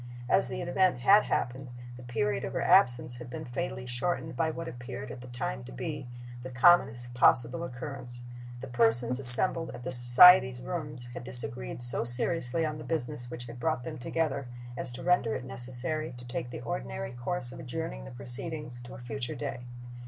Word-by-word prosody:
As - - +3
the 130 +7 -5
event 180 -3 +1
had 205 +10 +5
happened, 130 +2 -3 0.3
the 125 - -12
period 110 -4 -2
of - - -5
her - - -2
absence 120 0 +4
had 120 0 -10
been 125 - -7
fatally 120 0 -5
shortened 155 +6 -3
by 165 -1 0
what 165 +1 -6
appeared 120 +1 -8
at 125 - -10
the 125 - -11
time 65 - -5
to - - -11
be, 140 - -6 0.3
the 130 - -8
commonest 120 -3 +3
possible 120 +4 +2
occurrence. 125 -3 -8 0.4
The 135 - -7
persons 120 +1 +8
assembled 140 +6 +4
at 120 - -11
the - - -4
society's 130 +2 +7
rooms 145 -4 -5
had - - -8
disagreed 120 - -2
so 120 -1 +1
seriously 125 +5 -1
on 150 -1 -5
the - - -8
business 135 -5 -5
which 120 0 -8
had 120 +1 -11
brought 155 -3 -2
them - - -7
together 140 0 -3 0.3
as 125 - -2
to 130 - -8
render 175 -11 +1
it 130 - -6
necessary 130 +5 -5
to 125 0 -12
take 120 0 -5
the - - -8
ordinary 65 - -5
course 120 +2 -4
of - - -11
adjourning - - -6
the - - -9
proceedings 125 - -5
to - - -11
a - - -10
future 120 +1 -6
day. 140 -4 -5
125 Hz, 190 wpm, -28 LUFS, 120-150 Hz, 0.4 s, persons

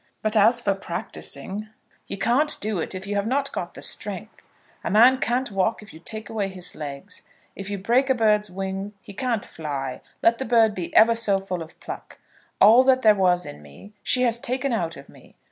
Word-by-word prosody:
But 215 +1 +1
as 220 +3 +5
for 200 -4 +1
practising, 195 +2 -4 0.4
you - - -5
can't 260 +9 +1
do 210 -3 -1
it 165 - -3
if 185 +1 -6
you 205 - -3
have 200 +1 -1
not 275 +3 0
got - - -5
the - - -9
strength. - - -5 0.3
A - - -2
man 245 +5 +6
can't 250 0 -1
walk 195 +3 0
if 210 - -14
you 160 - -12
take 215 +5 -5
away 210 -3 -2
his 185 -2 -4
legs. 140 -2 -7 0.3
If 195 0 -7
you 200 - -3
break 240 +8 +2
a 265 - +4
bird's 210 -3 +2
wing 195 +2 -5
he 210 -4 -11
can't 235 -1 -2
fly, 140 -5 -5 0.2
let 230 0 +4
the - - -1
bird 225 -2 +4
be 180 -4 -5
ever 230 +1 +7
so 215 -4 +2
full 185 -3 -5
of 160 0 -11
pluck. - - -9 0.4
All 230 +5 +8
that 260 -1 +4
there 215 -1 +7
was 180 -3 +2
in 75 - -9
me 75 - -15
she 255 - +1
has 235 -1 +2
taken 255 +2 -1
out 170 -7 -2
of 140 - -12
me. - - -19
210 Hz, 215 wpm, -24 LUFS, 190-235 Hz, 0.4 s, All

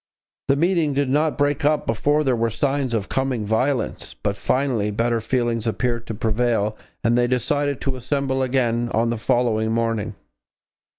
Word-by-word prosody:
The 135 - +4
meeting 165 -2 +1
did 140 -2 +1
not 150 +2 +1
break 145 +1 +1
up 150 +1 +2
before 145 +7 +1
there 130 -3 +2
were 115 0 +1
signs 135 0 0
of 100 -3 -2
coming 130 -5 -1
violence, 125 +5 -1
but 100 - -2
finally 125 -1 0
better 115 +2 0
feelings 115 -1 -1
appeared 120 +1 -1
to 110 - -4
prevail 110 -1 0 0.3
and 115 +1 +3
they 120 0 +3
decided 140 +3 0
to 135 -1 -2
assemble 135 +1 -1
again 120 -2 +1
on 115 +1 +2
the 120 - -2
following 110 -2 +1
morning. 115 -2 -1
120 Hz, 165 wpm, -22 LUFS, 115-140 Hz, 0.3 s, The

